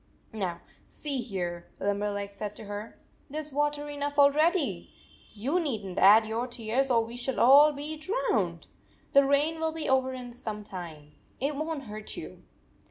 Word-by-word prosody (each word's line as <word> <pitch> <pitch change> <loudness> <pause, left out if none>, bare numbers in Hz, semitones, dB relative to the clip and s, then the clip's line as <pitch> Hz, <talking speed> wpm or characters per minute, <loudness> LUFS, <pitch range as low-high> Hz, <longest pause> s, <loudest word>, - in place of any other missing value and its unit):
"Now, 185 -5 -3 0.3
see 285 -3 -3
here," 175 -7 -4
Limberleg 205 0 -1
said 205 +1 -5
to - - -9
her, 205 +2 -7 0.3
"there 300 +3 -4
s 305 0 -7
water 295 +1 0
enough 290 0 -4
already! 305 +4 +3 0.4
You 270 - 0
need 250 - -2
n 185 - -6
t - - -2
add 215 +3 +8
your 225 +3 -2
tears, 245 +2 -1
or 230 -2 +3
we 230 +1 -9
shall 245 +1 -3
all 285 +5 +8
be 290 +1 -5
103 310 +8 -4 0.2
drowned! - - -1 0.5
The 280 - +7
rain 290 +4 +2
will 320 0 0
be 320 -1 -4
over 260 0 +2 0.2
some 215 -3 -6
time. 165 -7 -8 0.3
It 280 +3 -1
won 310 0 -3
t - - -13
hurt 215 0 -7
you." - - -8
255 Hz, 175 wpm, -28 LUFS, 210-290 Hz, 0.5 s, add